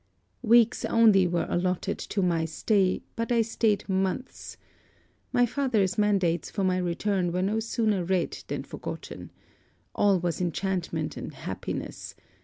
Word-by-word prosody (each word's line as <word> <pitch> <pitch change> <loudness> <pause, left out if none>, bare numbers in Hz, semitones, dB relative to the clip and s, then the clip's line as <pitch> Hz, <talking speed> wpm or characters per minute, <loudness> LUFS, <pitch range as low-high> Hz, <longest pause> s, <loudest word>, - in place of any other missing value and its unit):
'Weeks 235 -1 +4
only 215 -5 +5
were 175 0 0
allotted 185 +2 -1
to 195 - -2
my 170 -2 +1
stay, 185 +4 +1
but 230 +1 -3
I 230 -1 +4
staid 220 -2 0
months. 190 +6 -3 0.7
My 245 -1 +4
father's 230 -7 0
mandates 190 -6 +1
for 200 - -2
my 185 -1 +2
return 180 +1 0
were 180 +1 -1
no 210 +3 0
sooner 220 -4 0
read 180 0 -1
than - - -3
forgotten. - - -7 0.6
All 200 -3 +3
was 175 0 -2
enchantment 175 -2 -2
and - - -6
happiness. - - -6
195 Hz, 135 wpm, -27 LUFS, 180-220 Hz, 0.7 s, only